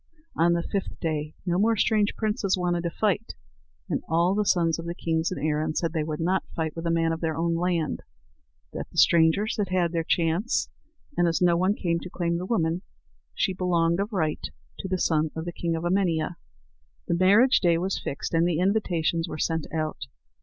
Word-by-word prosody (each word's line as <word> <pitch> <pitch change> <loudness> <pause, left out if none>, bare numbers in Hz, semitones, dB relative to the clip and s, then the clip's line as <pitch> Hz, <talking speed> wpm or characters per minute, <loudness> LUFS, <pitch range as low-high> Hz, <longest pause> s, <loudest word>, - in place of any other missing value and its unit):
On 170 +1 +3
the 170 0 0
fifth 195 +1 -4
day 155 -2 -3
no 175 0 +1
more 225 +2 +3
strange 215 0 +2
princes 210 -3 0
wanted 175 -1 0
to - - +1
fight; 210 +4 -1 0.5
and - - -1
all 170 +3 +3
the 210 +1 +1
sons 165 -3 +2
of 165 - -6
kings 165 +1 0
in - - -3
Erin 155 0 -1
said 165 -2 -1
they 160 -2 0
would 150 0 -4
not 185 +3 +1
fight 160 -2 -2
with 165 0 -4
a - - +1
man 165 0 +2
of 165 - -3
their 160 -2 -1
own 170 +1 +1
land, 170 -2 -1 0.7
that - - -5
the - - -15
strangers 170 +6 +4
had 205 -3 -1
had 180 -2 +1
their 165 -1 -1
chance, 170 +7 0 0.5
and, 175 - +3
as 165 - +1
no 175 0 +3
others 200 +3 +2
came 170 -1 0
to 180 - -8
claim 170 -1 -1
the 180 - -5
woman, 170 -5 0 0.5
she 190 - +1
belonged 170 -1 +1
of 205 +3 -2
right 160 -7 -1 0.3
to - - -4
the 185 0 -1
son 160 -3 +1
of 160 0 -4
the 175 - -5
king 170 -1 -2
of 165 - -4
Emania. 175 -3 +1 0.7
The 175 - +1
marriage 200 +9 +5
day 170 -2 +3
was 185 +3 -1
fixed, 140 - -4
and 165 +1 +3
the 170 -3 0
invitations 175 -3 +1
were - - -5
sent 160 -1 -1
out. 155 -1 -3
170 Hz, 205 wpm, -26 LUFS, 165-185 Hz, 0.7 s, marriage